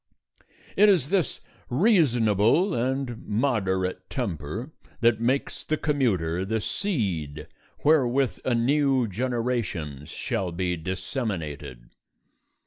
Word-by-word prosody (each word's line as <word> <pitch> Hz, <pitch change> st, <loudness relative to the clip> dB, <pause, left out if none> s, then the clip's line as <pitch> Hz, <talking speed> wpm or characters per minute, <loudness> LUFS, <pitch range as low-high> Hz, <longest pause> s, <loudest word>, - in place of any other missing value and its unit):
It 210 Hz, +1 st, +6 dB
is 165 Hz, -9 st, +3 dB
this 185 Hz, -9 st, +1 dB, 0.3 s
reasonable 130 Hz, -, +3 dB
and 130 Hz, -2 st, -2 dB
moderate 95 Hz, -6 st, 0 dB
temper 110 Hz, -, -4 dB, 0.3 s
that 115 Hz, -1 st, +3 dB
makes 130 Hz, +4 st, 0 dB
the 155 Hz, -, -1 dB
commuter 95 Hz, -, 0 dB
the 110 Hz, +3 st, -1 dB
seed 90 Hz, -, -2 dB, 0.4 s
wherewith 135 Hz, -4 st, +3 dB
a 125 Hz, -, +1 dB
new 135 Hz, 0 st, +2 dB
generation 105 Hz, -, -2 dB
shall 95 Hz, -2 st, -3 dB
be 90 Hz, +1 st, -1 dB
disseminated. 85 Hz, -, -4 dB
115 Hz, 95 wpm, -26 LUFS, 95-135 Hz, 0.4 s, It